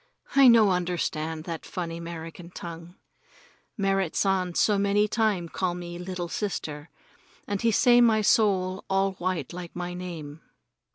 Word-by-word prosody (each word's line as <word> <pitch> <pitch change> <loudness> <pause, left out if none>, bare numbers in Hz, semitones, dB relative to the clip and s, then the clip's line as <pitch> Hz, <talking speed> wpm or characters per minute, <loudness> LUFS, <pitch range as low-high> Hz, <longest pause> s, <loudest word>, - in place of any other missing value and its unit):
I 275 -1 +8
no 225 -4 +7
understand 165 -3 -2
that 165 -1 -6
funny 170 -2 -5
'Merican 170 0 -8
tongue. 170 +1 -8 0.8
Merrit 195 -4 0
San 185 -3 +1
so 205 -2 +3
many 200 +1 +2
time 210 -6 0
call 175 +1 -2
me 175 -1 -7
little 180 -1 -4
sister, 160 -6 -4 0.6
and 205 -1 -2
he 230 - +3
say 240 +2 +5
my 225 -2 +4
soul 190 -3 +2
all 195 0 +2
white 175 -5 -2
like 175 -1 -8
my 175 0 -4
name. 165 -4 -7
180 Hz, 145 wpm, -26 LUFS, 170-200 Hz, 0.8 s, I